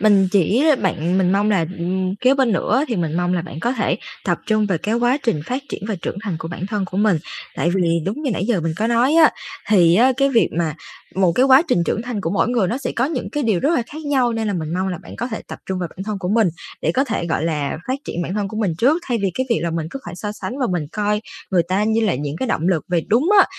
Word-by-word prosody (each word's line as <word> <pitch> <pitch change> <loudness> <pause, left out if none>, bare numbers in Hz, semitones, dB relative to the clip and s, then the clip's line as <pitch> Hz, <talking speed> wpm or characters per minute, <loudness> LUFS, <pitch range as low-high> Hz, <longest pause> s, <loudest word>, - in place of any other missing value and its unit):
mình 200 -2 +4
chỉ 205 - +3 0.2
bạn 180 0 0
mình 185 0 +2
mong 205 +2 +2
là, 180 -6 +2
ừm, 185 +2 -1
kế 255 +5 +3
bên 260 -5 +2
nữa 245 - +1
thì 230 - -1
mình 165 -2 -1
mong 175 +1 +1
là 170 - -1
bạn 160 -2 -8
có 240 - 0
thể 260 - 0 0.3
tập - - +1
trung 215 -2 +2
về 180 -5 0
cái 215 +6 -1
quá 245 +4 +2
trình 225 - 0
phát 260 +3 -2
triển - - -6
và 215 - 0
trưởng - - -3
thành 190 -6 -2
của 165 - -6
bản 175 +2 -5
thân 205 -2 -2
của 185 +1 -7
mình. 205 -5 +3 0.4
Tại 170 - +1
vì 170 -3 +2
đúng 220 +11 -3
như 275 - 0
nãy 195 -1 -1
giờ 220 -8 +1
mình 165 0 -1
có 220 - 0
nói 235 +5 +3
á, 325 -1 +7 0.4
thì 175 -5 +5
á, 255 +6 +5
cái 275 0 +3
việc 235 -5 +3
mà 160 -3 0 0.4
một 185 -3 +3
cái 255 - +3
quá 265 +3 +7
trình 170 - +3
trưởng 220 - -1
thành 240 -4 -4
của 165 - -2
mỗi 205 - +1
người 230 -7 +1
nó 245 - -1
sẽ 270 - -3
có 245 - +2
những 280 -3 -3
cái 295 - -1
điều 215 -7 +1
rất 320 +4 +2
là 245 - +2
khác 310 +4 -9
nhau, 260 -5 +2
nên 225 -1 -2
là - - 0
mình 160 0 -3
mong 190 +1 0
là 180 -3 -3
bạn - - -11
có 240 - -2
thể 220 - -5
tập - - -7
trung 190 -1 -2
vào 175 -2 -3
bản - - -20
thân 210 -2 -3
của 180 - -3
mình 215 -1 +3 0.3
để 160 - +1
có 270 +7 +2
thể, 220 -9 -2
gọi 160 -1 -1
là, 150 -4 -1
phát 265 +2 0
triển 175 - -3
bản 180 +3 -4
thân 205 -2 -1
của 215 - -7
mình 205 -6 0
trước 285 - +4
thay 235 -2 +1
vì 195 -2 0
cái 260 0 -1
việc 230 - +3
là 170 - -1
mình 160 -1 -2
cứ 275 - -5
phải 175 - -7
so 210 +2 -4
sánh 250 +5 -6
và 255 - +1
mình 165 -4 -1
coi 210 0 0 0.3
người 180 -3 +3
ta 190 +5 0
như 220 +1 +2
là 205 - +2
những 145 +3 -4
cái 260 - -2
động 170 -5 0
lực. 170 -5 +1
Về 175 -1 +2
đúng 250 +10 +3
á, - - +8
205 Hz, 300 wpm, -20 LUFS, 175-240 Hz, 0.4 s, á